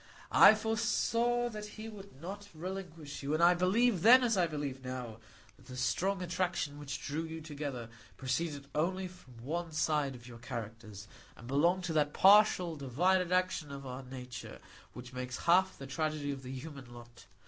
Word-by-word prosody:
I 215 - +9
foresaw 230 +2 +1
that 215 -2 -7
he 215 +1 -6
would 200 -9 -11
not 200 +5 -7
relinquish 170 -4 -6
you, 145 +2 -1
and 165 - +1
I 175 +1 +7
believed 190 +3 +2
then, 250 +5 +8
as 230 -3 +2
I 180 -3 +3
believe 145 -4 -4
now, 125 -3 -6 0.4
that - - -20
the 130 - -8
strong 185 +10 0
attraction 170 -4 -2
which 140 -1 -6
drew 150 +3 -2
you 160 0 -6
together 145 -6 -5 0.3
proceeded 140 +2 -2
only 185 +5 0
from 140 -9 -16
one 165 +4 -3
side 150 -3 0
of 120 -1 -13
your 120 -1 -11
characters, 110 -3 -7 0.3
and 120 - -12
belonged 170 +8 +2
to 175 -2 -2
that 150 -1 +2
partial, 190 -4 +6
divided 175 +7 +1
action 180 -5 0
of 140 0 -7
our 130 0 -6
nature 125 -1 -8 0.4
which 125 +1 -10
makes 125 0 -4
half 185 +3 +3
the 135 - -8
tragedy 150 +1 -2
of 135 -1 -6
the 130 0 -8
human 135 -2 -8
lot. 120 -1 -13
155 Hz, 175 wpm, -32 LUFS, 130-185 Hz, 0.4 s, I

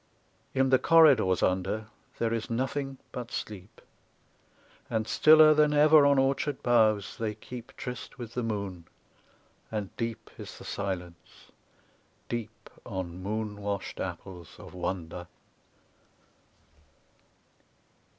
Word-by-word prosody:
In 130 0 +2
the 130 - +6
corridors 135 - +5
under 95 +4 0 0.3
there 115 -1 0
is 115 -1 -3
nothing 135 +3 -2
but 120 -1 -6
sleep. 105 +1 -7 1.1
And 110 -1 -1
stiller 155 +3 +7
than 150 0 +3
ever 150 0 +7
on 140 -1 +4
orchard 135 +1 0
boughs 110 -4 +2
they 110 -2 -2
keep 120 +2 -10
Tryst 125 -1 -7
with 120 -2 -8
the 125 - -2
moon, 100 -7 -4 0.8
and 105 -3 -4
deep 115 -1 -4
is - - -9
the - - -12
silence, 90 -4 -6 0.8
deep 115 -2 -5 0.2
On 90 -1 -5
moon 105 +1 -4
washed 100 -1 -4
apples 90 -4 -7
of - - -12
wonder. 90 -1 -4
110 Hz, 110 wpm, -29 LUFS, 95-130 Hz, 1.1 s, stiller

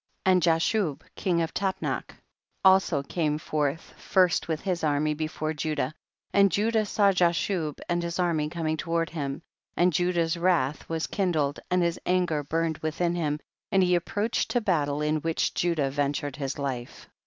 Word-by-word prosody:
27. 190 - +5
And 180 - +3
Jashub, 165 0 +1
king 175 -3 0
of 165 - -4
Tapnach, 190 -1 -2 0.5
also 190 -6 +5
came 150 +1 -1
forth 150 0 -2
first 185 -2 +2
with 160 -2 -2
his 180 -3 -2
army 150 0 +1
before 155 0 -3
Judah, 150 -2 -2 0.4
and 200 -1 +5
Judah 215 +3 +1
saw 200 -1 +3
Jashub 175 -3 0
and 175 0 0
his 170 0 -3
army 165 -4 +1
coming 160 -1 -2
toward 165 0 -1
him, 145 -1 -4 0.3
and 175 0 +3
Judah's 170 0 +1
wrath 170 -6 +1
was 165 -1 -1
kindled, 155 -7 0
and 180 0 +2
THE - - +3
BOOK - - +4
OF - - -4
JASHER. - - -12
Ill 180 - +3
his - - +4
anger 160 -5 -1
burned 160 +1 -1
within 170 +2 -1
him, 150 -4 -1 0.3
and 190 -1 +4
he 180 0 +3
approached 205 +6 0
to 245 - +2
battle 150 -8 0
in 150 +1 +1
which 160 +1 -1
Judah 160 -6 0
ventured 145 0 -1
his 135 -2 -3
hfc. 130 -4 -5
165 Hz, 180 wpm, -27 LUFS, 150-180 Hz, 0.5 s, 27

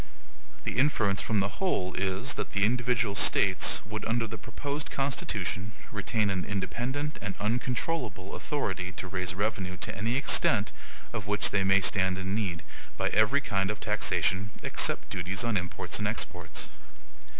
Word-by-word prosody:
The - - -1
inference 110 -8 +3
from 105 -3 +1
the 95 0 -3
whole 95 - +1
is, 95 +7 0
that - - -4
the 100 0 +3
individual 120 -2 +1
States 95 +1 +4
would, 110 -1 -5
under 115 +1 +1
the 110 - -5
proposed 145 +1 -4
Constitution, 105 -8 -1 0.2
retain 105 0 0
an 95 -1 -1
independent 120 +9 -2
and 100 -1 -3
uncontrollable 120 - -1
authority 95 - -2
to 95 0 -5
raise 90 -1 -2
revenue 100 -3 -1
to - - -3
any 115 +5 0
extent 140 - +3 0.4
of 105 -2 -4
which 105 0 +2
they 100 -1 +2
may 95 +1 +5
stand 95 -1 +2
in 95 +1 -2
need, 95 -6 -1 0.3
by - - +1
every 110 +7 +4
kind 95 -6 0
of 105 - -3
taxation, 95 +3 +1
except - - +2
duties 95 +4 -1
on 115 -2 +1
imports 90 -2 -1
and - - 0
exports. - - -3
100 Hz, 155 wpm, -29 LUFS, 95-120 Hz, 0.4 s, may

